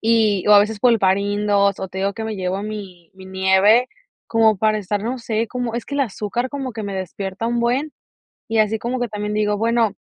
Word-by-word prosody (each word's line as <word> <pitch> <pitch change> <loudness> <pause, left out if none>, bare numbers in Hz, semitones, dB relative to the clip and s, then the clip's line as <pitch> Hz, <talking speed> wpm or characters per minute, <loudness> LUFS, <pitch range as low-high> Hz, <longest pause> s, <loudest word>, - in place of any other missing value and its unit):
y, 220 -4 +2
o - - +7
a 205 - +9
veces 210 0 0
pulparindos 200 -2 +2
o 190 - -4
te 190 - -7
digo 200 +1 0
que 220 - -5
me 220 -2 -4
llevo 190 +1 -2
mi 195 -6 -8
mi 190 0 -13
nieve, 190 +6 +3 0.4
como 220 -2 +3
para 215 0 +2
estar, 205 +1 -3
no 250 +3 -3
sé, 230 -1 -2
como, 245 -2 -3
es 235 - -3
que 280 - -6
el 285 - 0
azúcar 240 +1 -2
como 270 -3 -4
que 220 - -6
me 200 -1 -4
despierta 190 +3 -4
un 235 0 0
buen, 260 +6 0 0.6
y 225 0 0
así 215 +1 +2
como 245 +3 -3
que 245 - -1
también 210 0 -4
digo, 210 -1 +1
bueno, 230 -1 +1
215 Hz, 220 wpm, -20 LUFS, 200-230 Hz, 0.6 s, a